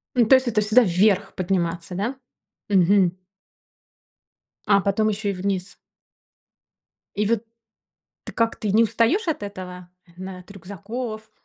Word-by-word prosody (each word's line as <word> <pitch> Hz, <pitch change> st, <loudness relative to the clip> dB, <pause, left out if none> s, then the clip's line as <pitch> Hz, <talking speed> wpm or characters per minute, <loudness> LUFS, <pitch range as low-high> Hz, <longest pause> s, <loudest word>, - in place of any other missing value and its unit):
Ну, 240 Hz, -2 st, +4 dB
то 265 Hz, -, +7 dB
есть 260 Hz, -1 st, +1 dB
это 215 Hz, -3 st, +1 dB
всегда 215 Hz, +4 st, +4 dB
вверх 195 Hz, +1 st, +2 dB
подниматься, 180 Hz, -1 st, -2 dB
да? 215 Hz, +8 st, -2 dB, 0.5 s
Мгм. 185 Hz, -1 st, +3 dB, 1.5 s
А, 200 Hz, -1 st, +4 dB
потом 205 Hz, +2 st, +1 dB
еще 210 Hz, 0 st, -2 dB
и -, -, -4 dB
вниз. 190 Hz, 0 st, -3 dB, 1.4 s
И 210 Hz, +1 st, 0 dB
вот 225 Hz, +1 st, 0 dB, 0.8 s
ты -, -, -9 dB
как, 230 Hz, -1 st, 0 dB
ты 210 Hz, -3 st, -3 dB
не 220 Hz, +3 st, +5 dB
устаёшь 230 Hz, -, +1 dB
от 310 Hz, -8 st, -2 dB
этого? 180 Hz, -3 st, -8 dB, 0.2 s
Э, -, -, -21 dB
на 185 Hz, 0 st, -7 dB
от 180 Hz, +2 st, -14 dB
рюкзаков? 215 Hz, +4 st, -7 dB
200 Hz, 140 wpm, -23 LUFS, 185-220 Hz, 1.5 s, то